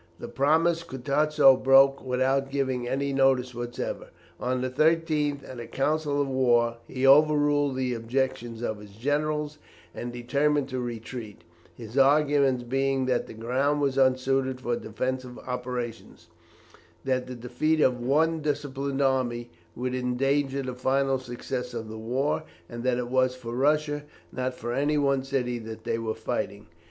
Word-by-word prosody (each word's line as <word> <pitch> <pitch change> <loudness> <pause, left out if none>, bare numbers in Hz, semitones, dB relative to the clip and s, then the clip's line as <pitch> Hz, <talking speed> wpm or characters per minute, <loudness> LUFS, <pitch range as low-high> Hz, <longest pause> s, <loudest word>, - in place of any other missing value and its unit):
This - - -8
promise 160 +6 +2
Kutusow 140 -1 +3
broke 135 +1 +6
without 130 +1 +1
giving 130 -3 -1
any 140 +2 -1
notice 135 -2 +2
whatever. 120 0 -5 0.3
On 125 0 -1
the 130 - -1
13th, 155 -1 +1
at 130 - -8
a 115 - -7
council 145 +1 0
of 140 - +1
war, 120 -3 +2
he 130 +1 -2
overruled 145 0 +4
the 130 -1 -1
objections 120 0 -2
of 110 -3 -2
his 105 -1 -13
generals, 150 +5 -1 0.3
and 120 - -5
determined 140 +4 0
to 130 -1 -3
retreat, 115 -4 -6 0.3
his 115 +3 -4
arguments 140 -2 +4
being 135 +1 0
that 125 -1 0
the - - -10
ground 130 +6 0
was 140 -2 +1
unsuited 130 0 +2
for 120 -1 -1
defensive 125 +3 -4
operations; 125 -2 -5 0.8
that 130 -1 0
the 125 - -6
defeat 125 +7 0
of 125 -4 +2
the 120 - -4
one 160 +4 +2
disciplined 140 -2 -2
army 120 -3 0 0.2
would 125 +1 -3
endanger 135 +2 0
the 130 -1 -4
final 135 +1 +1
success 125 0 -5
of 110 -1 -5
the 110 0 -7
war; 130 +8 -1 0.3
and 120 0 -7
that 125 -1 +1
it 125 -1 -3
was 130 0 +2
for 120 -2 -7
Russia, 145 +2 +1 0.3
not 130 0 -3
for 120 -1 -4
any 145 +3 +1
one 140 -2 +2
city, 125 -3 -1
they 110 0 -4
were 110 -1 -3
fighting. 110 -3 -4
130 Hz, 155 wpm, -27 LUFS, 120-140 Hz, 0.8 s, broke